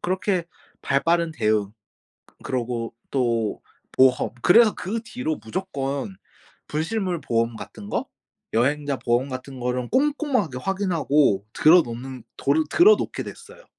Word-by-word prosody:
그렇게 185 0 0 0.4
발 140 - +1
빠른 170 0 +2
대응 105 -6 0 0.7
그러고 120 -2 -3 0.2
또 115 -5 0 0.3
보험 130 -1 +4
그래서 220 +3 +6
그 215 +5 -3
뒤로 230 -9 -3
무조건 140 - -4 0.5
분실물 175 +3 -2
보험 115 -2 0
같은 105 -2 -10
거 - - -1 0.5
여행자 140 +4 +1
보험 120 +3 0
같은 130 0 -7
거를 125 0 -2
꼼꼼하게 270 - +1
확인하고 150 - +1
들어 170 +3 +6
놓는 125 -1 -8
도르 150 +3 +2
들어 420 +6 +7
놓게 - - -4
됐어요. 470 +2 -12
140 Hz, 265 characters per minute, -24 LUFS, 125-190 Hz, 0.7 s, 들어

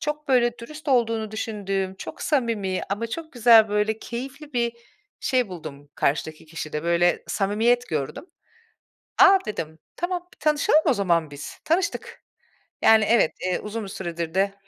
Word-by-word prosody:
Çok 300 -1 -4
böyle 240 -2 +3
dürüst 300 +6 -9
olduğunu 230 -4 +1
düşündüğüm, 195 -3 -3
çok - - -8
samimi 225 -9 0
ama 220 +4 -1
çok 315 +7 -7
güzel 230 -3 +6
böyle 210 +1 0
keyifli 270 +6 -7
bir 235 -1 0 0.5
şey 250 -5 +1
buldum 150 -5 -9
karşıdaki 155 +2 -1
kişide, 155 -1 -5
böyle 170 +1 +2
samimiyet 225 +5 +1
gördüm. 150 - -3 0.9
"A," 390 0 +8
dedim, 160 -7 -5 0.2
"tamam, 355 0 -3
bir - - -26
tanışalım 305 +1 +3
o 275 - +4
zaman 170 -7 +1
biz," 145 0 -8
tanıştık. 340 +2 -1 0.6
Yani 220 -1 +6
evet, 225 -8 +3
eee, 185 -1 0
uzun 215 +1 -5
bir - - -8
süredir 170 -3 -5
de 195 +1 +1
220 Hz, 145 wpm, -24 LUFS, 180-250 Hz, 0.9 s, A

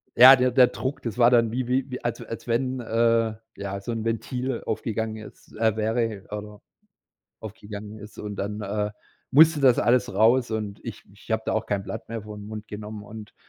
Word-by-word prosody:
ja, 130 +3 +10
der 125 -1 +2
der 125 0 +6
Druck, 130 +3 -4
das 115 -1 -4
war 120 -1 +6
dann 115 -2 +3
wie 125 +1 -2
wie 125 0 -1
als 120 - -2
w - - -8
als 115 - -8
wenn, 130 +2 0
äh, 115 -1 +2 0.2
ja 100 0 -5
so 120 - -5
'n 115 -1 -3
Ventil 125 +2 -2
aufgegangen 110 0 -2
ist 110 -1 -13
äh, 110 -1 +2
wäre 110 -2 -1
oder 105 0 -7 0.8
aufgegangen 105 0 -8
ist 105 0 -12
und 105 -1 -6
dann, 105 +2 -4
äh, 105 +1 -2 0.4
musste 155 +2 +6
das 130 -3 +5
alles 120 -4 +2
raus 115 +4 +4
und 105 -2 -4
ich 115 -3 -8
ich 105 +3 -18
habe 110 0 0
da - - -1
auch 110 - -1
kein 100 -1 -1
Blatt 95 0 -7
mehr 115 -1 -5
vor 105 0 -9
'n 105 0 -9
Mund 105 -1 -8
genommen 105 0 -7
und 105 0 -11
110 Hz, 205 wpm, -25 LUFS, 105-120 Hz, 0.8 s, ja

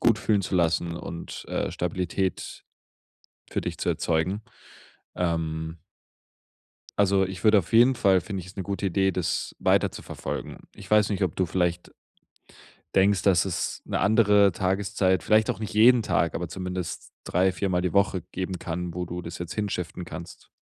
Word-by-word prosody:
gut 115 -2 +4
fühlen 105 -3 +1
zu 95 - -3
lassen 85 -1 +1
und, 85 0 -7
äh, - - -1
Stabilität 90 +1 -3 0.9
für - - -1
dich - - -5
zu - - -2
erzeugen. 85 +6 0 0.7
Ähm 80 -1 -2 1.2
also 100 -1 +4
ich 95 -1 -6
würde 105 -1 +6
auf 90 - -4
jeden 120 +3 +6
Fall 100 -6 +3
finde 95 +1 -5
ich 90 - -11
ist 95 - -13
'ne 95 - -3
gute 100 +1 -3
Idee, 95 +1 +2
das 90 -2 -2
weiterzuverfolgen. - - -1 0.2
Ich - - -13
weiß 105 -1 +5
nicht, 100 -1 -1
ob 90 -5 0
du 95 - +1
vielleicht 90 0 -1 1.0
denkst, 95 0 +4
dass 95 -2 +3
es 90 - -3
'ne - - -1
andere 105 -1 +5
Tageszeit 95 0 0
vielleicht 110 0 +3
auch - - -1
nicht 110 - -4
jeden 115 +3 +6
Tag, 85 -5 0
aber 90 - -2
zumindest 90 0 -5
drei 95 +2 +2
viermal 95 -1 -1
die 90 0 -2
Woche 95 -2 +2
geben 95 0 -3
kann, 85 +1 -4
wo 90 0 -4
du 90 +1 -5
das 85 0 -7
jetzt 85 -1 -6
hinshiften 90 -3 -3
kannst? 85 +1 -10
95 Hz, 165 wpm, -26 LUFS, 85-100 Hz, 1.2 s, würde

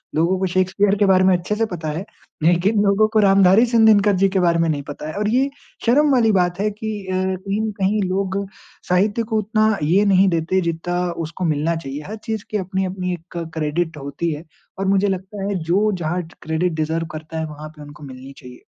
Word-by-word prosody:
लोगों 170 +4 +2
को 190 - 0
शेक्सपियर 185 +2 +1
के 205 - +4
बारे 185 -1 +4
में 185 -1 +5
अच्छे 180 +5 -3
से 225 +1 +1
पता 170 -6 -5
है। 190 - -5 0.4
लेकिन 185 +5 +3
लोगों 200 +2 +3
को 220 - +4
रामधारी 195 +2 +5
सिंह 230 -2 +3
दिनकर 205 -2 +5
जी 195 +1 +4
के 190 0 0
बारे 170 -1 +2
में 165 - +2
नहीं 145 -2 -1
पता 145 +1 -8
है। - - -6
और 210 0 0
ये 260 +4 +2 0.4
शर्म 285 +5 +4
वाली 230 -4 +4
बात 180 -1 +1
है 210 - +1
कि 220 +1 -6 0.2
अ, 185 - -3 0.3
कहीं 200 +2 -1
ना 220 -1 -2
कहीं 200 +2 +1
लोग 190 0 -1 0.5
साहित्य 205 +5 +2
को 220 0 -2
उतना 215 0 +1
ये 190 +7 +3
नहीं 195 0 +4
देते, 170 +2 0
जितना 170 +1 -2 0.3
उसको 170 +3 -5
मिलना 155 +2 0
चाहिए। 145 -2 -6
हर 215 - -5
चीज़ 220 -3 -3
की 215 - 0
अपनी 190 0 -2
अपनी 180 -1 -3
एक 175 0 -9 0.2
क्रेडिट 160 +1 -2
होती 140 +4 -3
है। 155 +3 -8 0.3
और 195 - -1
मुझे 195 +1 +3
लगता 195 +1 -4
है, 205 - -1
जो 195 +6 +2
जहाँ 175 +3 -1 0.2
क्रेडिट 160 +2 -1
डिजर्व 160 +1 -1
करता 155 +1 -6
है, 160 - -2
वहाँ 150 0 -9
पे 150 - -13
उनको 145 0 -12
मिलनी 135 0 -10
चाहिए। 125 -2 -12
185 Hz, 220 wpm, -20 LUFS, 165-205 Hz, 0.5 s, में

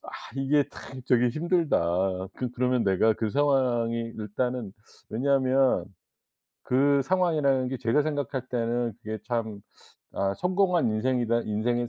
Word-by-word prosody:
'아 - - -10 0.3
이게 140 +1 +2
참 130 -1 -10
저기 125 -1 +4
힘들다.' 95 - 0
그 125 -2 -3
그러면 125 -1 +1
내가 100 +3 +3
그 110 0 -2
상황이 120 -4 +1
일단은 110 +1 -3 0.4
왜냐하면 130 -3 +2 0.8
그 140 +2 +3
상황이라는 150 -6 +1
게 130 - -3
제가 120 +5 +2
생각할 140 -4 -3
때는 120 -1 -1
그게 110 0 -5
참 110 -4 -3 0.5
'아 100 0 -1
성공한 180 -4 +2
인생이다. 115 +1 +1
인생의 120 +3 -1
125 Hz, 275 characters per minute, -27 LUFS, 115-140 Hz, 0.8 s, 저기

